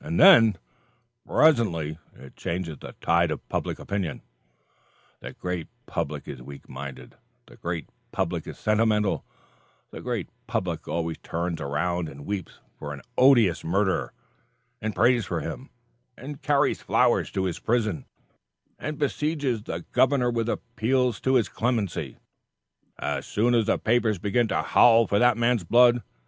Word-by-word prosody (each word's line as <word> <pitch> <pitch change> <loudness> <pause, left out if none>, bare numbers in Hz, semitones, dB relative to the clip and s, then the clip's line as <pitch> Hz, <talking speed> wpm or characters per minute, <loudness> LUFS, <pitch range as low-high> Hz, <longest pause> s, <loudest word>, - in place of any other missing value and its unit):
And 160 +3 -2
then, 115 - +8 0.7
presently, 85 - +2 0.2
it 65 - -14
changes 85 -4 -4
the - - -10
tide 85 0 +3
of 75 - -5
public - - -2
opinion. 95 -7 -4 1.0
The - - -8
great 90 -3 -4 0.2
public - - -4
is 65 - -7
weak 70 +2 -11
minded; 65 -3 -9 0.3
the - - -16
great 85 -3 -4 0.2
public - - -2
is - - -8
sentimental; 105 -1 +1 0.7
the - - -8
great - - -3 0.2
public - - -3
always 85 -1 -2
turns 85 0 -3
around 85 +4 -1
and 70 +1 -11
weeps 100 -4 -4 0.3
for 75 0 -5
an 70 -3 -10
odious 120 -9 +5
murderer, 95 +3 0 0.7
and 110 0 -3
prays 120 -2 +3
for - - -2
him, - - -6 0.5
and 140 +3 -8
carries 145 -2 +2
flowers - - +2
to 95 - 0
his 90 -3 -2
prison 110 - -1 0.7
and 155 -1 -4
besieges 145 -4 -1
the 85 -5 -6
governor 130 -2 +3
with 115 -1 -1
appeals 120 0 0
to 130 0 +2
his 120 -4 +3
clemency, 115 -5 -2 0.8
as - - -2
soon 120 +4 +1
as 115 -3 +2
the - - +2
papers 115 -2 +1
begin 105 +6 +1
to - - 0
howl 115 -1 +5
for 100 0 +1
that 120 -2 +4
man's 120 -3 +2
blood. 120 +5 +5
110 Hz, 145 wpm, -26 LUFS, 85-120 Hz, 1.0 s, then